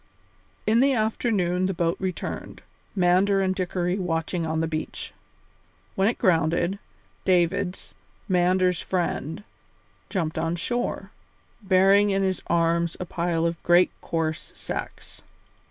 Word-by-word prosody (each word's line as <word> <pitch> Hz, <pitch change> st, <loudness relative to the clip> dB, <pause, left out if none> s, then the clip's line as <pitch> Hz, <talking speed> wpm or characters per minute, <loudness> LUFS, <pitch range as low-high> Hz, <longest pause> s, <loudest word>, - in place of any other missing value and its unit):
In 220 Hz, +2 st, +3 dB
the 275 Hz, +2 st, +4 dB
afternoon 210 Hz, -5 st, +1 dB
the 190 Hz, -, -2 dB
boat 170 Hz, 0 st, +1 dB
returned, 185 Hz, -2 st, -5 dB, 0.3 s
Mander 190 Hz, +2 st, +3 dB
and 190 Hz, -1 st, +1 dB
Dickory 180 Hz, 0 st, -1 dB
watching 165 Hz, -1 st, -1 dB
on 160 Hz, 0 st, -1 dB
the 165 Hz, -, 0 dB
beach. 155 Hz, -1 st, -5 dB, 0.8 s
When 190 Hz, +1 st, +2 dB
it 230 Hz, -, 0 dB
grounded, 170 Hz, +2 st, +2 dB, 0.4 s
Davids, 180 Hz, +1 st, 0 dB, 0.3 s
Mander's 180 Hz, -1 st, +2 dB
friend, 175 Hz, -1 st, -2 dB, 0.7 s
jumped 160 Hz, -5 st, -2 dB
on 165 Hz, +1 st, -1 dB
shore, 240 Hz, +8 st, -3 dB, 0.5 s
bearing 195 Hz, +1 st, +4 dB
in 195 Hz, 0 st, +1 dB
his 190 Hz, -1 st, 0 dB
arms 170 Hz, 0 st, +1 dB
a 180 Hz, -, -3 dB
pile 170 Hz, -1 st, -1 dB
of 170 Hz, 0 st, -2 dB
great 175 Hz, +1 st, +4 dB
coarse 160 Hz, -2 st, -3 dB
sacks. -, -, -7 dB
180 Hz, 120 wpm, -25 LUFS, 170-195 Hz, 0.8 s, the